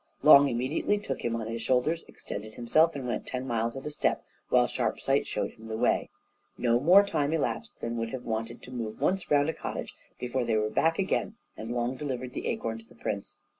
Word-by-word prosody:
Long 145 -2 +9
immediately 130 +11 0
took 205 - -4
him 115 -1 0
on 115 -1 -3
his 115 +1 -4
shoulders, 130 +8 +1
extended 110 +1 -8
himself, 155 +8 +3
and 135 -3 -4
went 120 - -3
ten 130 0 -3
miles 115 0 -1
at 135 - -8
a 150 - -3
step, - - 0 0.2
while - - +5
Sharpsight - - 0
showed - - -2
him 110 0 -13
the 110 0 -3
way. - - +2 0.5
No 120 -1 +3
more 180 +9 +7
time 150 -6 0
elapsed 140 -8 -2
than 115 0 -3
would 115 0 -2
have 130 +1 -5
been - - -4
wanted 115 +1 -3
to 125 - -10
move 115 -4 -5
once 180 +5 0
round 145 0 +4
a 160 - 0
cottage - - -5 0.3
before 125 +1 -1
they 115 -2 +1
were 110 0 +1
back 165 +7 +2
again, 195 +2 0 0.2
and 110 - -7
Long 120 +1 -1
delivered 130 -3 -4
the - - -4
acorn 115 0 -2
to 115 - -16
the - - -19
prince. 100 -1 -4
125 Hz, 220 wpm, -29 LUFS, 115-145 Hz, 0.5 s, Long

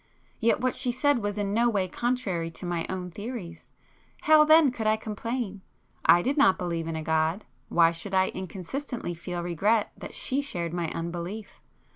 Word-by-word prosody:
Yet 230 0 +2
what 255 0 +1
she 245 - 0
said 285 +1 +2
was 205 0 -2
in 200 -1 -1
no 235 +2 +3
way 195 -4 0
contrary 200 -7 -1
to 165 - -8
my 175 -1 -2
own 180 -1 -4
theories,—how 230 - -1
then 310 -3 +6
could 225 -3 -3
I 215 0 +3
complain? 220 -1 -4 0.4
I 175 +1 +6
did 275 +3 0
not 230 -10 +5
believe 170 -2 -3
in 165 - -3
a 160 - -4
God; 160 +5 0 0.2
why 165 -1 +5
should 190 +4 -5
I 190 0 +3
inconsistently 190 - -5
feel 175 +1 -5
regret 205 +6 +1
that - - -8
she 270 +2 0
shared 170 - -4
my 170 -2 -1
unbelief? 175 +6 -5
195 Hz, 175 wpm, -27 LUFS, 170-240 Hz, 0.4 s, then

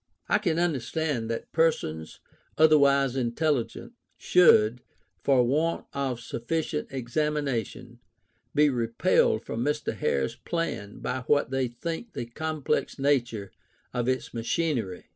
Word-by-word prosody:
I - - +3
can 165 -4 0
understand 150 -5 -1
that 115 - -4
persons, 80 - 0 0.4
otherwise 140 -4 +5
intelligent, 135 - -1 0.2
should, 125 -10 +5 0.4
for 135 -3 +4
want 155 +7 0
of 135 -4 -2
sufficient 150 +7 -3
examination, 130 -3 -2 0.6
be 150 +1 +5
repelled 115 0 +2
from 115 - -3
Mr. 150 +2 -1
Hare's 65 -1 -1
plan 165 -12 -4
by - - -2
what 145 -3 +2
they 135 -1 0
think 165 - -6
the - - -4
complex 155 +4 -2
nature 120 -8 0 0.4
of 120 -1 -1
its 130 -1 -1
machinery. 115 - -2
135 Hz, 115 wpm, -27 LUFS, 120-155 Hz, 0.6 s, otherwise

